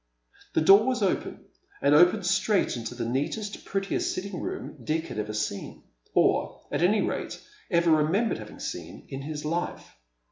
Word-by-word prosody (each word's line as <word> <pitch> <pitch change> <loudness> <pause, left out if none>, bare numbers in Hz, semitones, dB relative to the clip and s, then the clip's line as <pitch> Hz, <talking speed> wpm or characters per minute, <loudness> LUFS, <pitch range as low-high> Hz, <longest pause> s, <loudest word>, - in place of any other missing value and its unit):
The - - +4
door 195 +8 +7
was 250 -4 +1
open, 190 - -1 0.3
and 140 +1 +3
opened 180 +5 +5
straight 195 0 +2
into 120 0 -5
the 120 -1 -3
neatest, 200 - -3
prettiest 195 0 -1
sitting 190 -1 -4
room 135 - -6
Dick 160 +5 -1
had 120 -7 -5
ever 105 0 -3
seen 105 -2 -4 0.2
— - - -37
or, - - +2
at 145 - -1
any 200 +4 +4
rate, - - -3 0.3
ever 170 -3 +3
remembered 160 - +2
having 105 -1 -10
seen 85 0 -7
— - - -28
in 135 0 -4
his 150 +1 -5
life. 170 +3 -3
160 Hz, 175 wpm, -27 LUFS, 125-195 Hz, 0.3 s, door